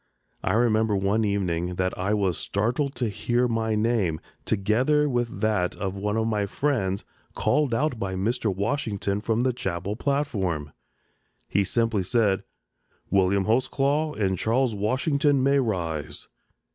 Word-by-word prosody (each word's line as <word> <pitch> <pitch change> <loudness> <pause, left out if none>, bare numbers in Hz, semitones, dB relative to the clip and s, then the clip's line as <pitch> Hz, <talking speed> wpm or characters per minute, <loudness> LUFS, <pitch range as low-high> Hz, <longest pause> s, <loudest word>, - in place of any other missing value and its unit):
I 95 - +1
remember 110 -2 +3
one 100 +3 +1
evening 90 -4 -1
that 95 +1 -1
I 95 +3 0
was 95 -4 +1
startled 125 - -1
to 120 -1 -1
hear 120 +4 0
my 110 -2 0
name, 105 -7 +1 0.3
together 125 +9 +2
with 120 -3 -2
that 105 -5 +1
of 95 -1 -3
one 105 +2 -1
of 110 - +1
my 105 -3 0
friends, 100 -6 -1 0.3
called 150 -4 +1
out 125 +1 0
by 95 -2 -2
Mr. 110 +3 0
Washington 100 -1 -1
from 110 +1 0
the 130 0 +1
chapel 100 -3 -3
platform. 100 - -1 0.8
He 100 - +2
simply 115 0 +1
said, 100 0 +1 0.7
"William 95 0 +3
Holtzclaw 140 +6 +1
and 95 -4 0
Charles 120 +1 +1
Washington 140 +6 +1
may 140 +1 +4
rise." 85 - -3
110 Hz, 140 wpm, -25 LUFS, 95-125 Hz, 0.8 s, may